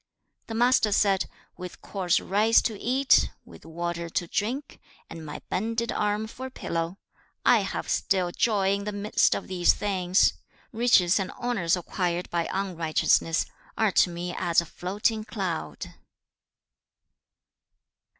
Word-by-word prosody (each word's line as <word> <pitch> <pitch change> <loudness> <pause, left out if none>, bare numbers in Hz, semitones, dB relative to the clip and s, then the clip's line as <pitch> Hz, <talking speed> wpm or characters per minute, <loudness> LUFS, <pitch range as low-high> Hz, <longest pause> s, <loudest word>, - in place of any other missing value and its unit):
The 225 - -5
Master 240 -2 +3
said, 195 -2 +2 0.3
'With 180 -1 -8
coarse 185 -4 0
rice 215 +4 +3
to 225 - -1
eat, 265 +3 +3 0.2
with - - -15
water 170 +1 -4
to 175 - -1
drink, 240 - -3 0.3
and 165 - -8
my 150 -1 -8
bended 230 +4 -1
arm 210 +1 0
for 255 +4 -7
a - - -9
pillow; 170 -6 -4 0.5
I - - +6
have - - -4
still 185 -3 0
joy 195 -1 +1
in 200 0 -3
the 210 - -2
midst 205 +1 +2
of - - -5
these 180 -2 +3
things. 185 -2 +2 0.4
Riches 220 -6 +4
and 190 - -2
honours 200 -9 0
acquired 175 0 -3
by 170 -1 -1
unrighteousness, 165 -3 +1 0.3
are 220 -2 +2
to 180 - +4
me 175 +1 -5
as 170 -1 +2
a 170 - -1
floating 205 +6 -2
cloud.' 185 - -4
195 Hz, 140 wpm, -26 LUFS, 175-220 Hz, 0.5 s, I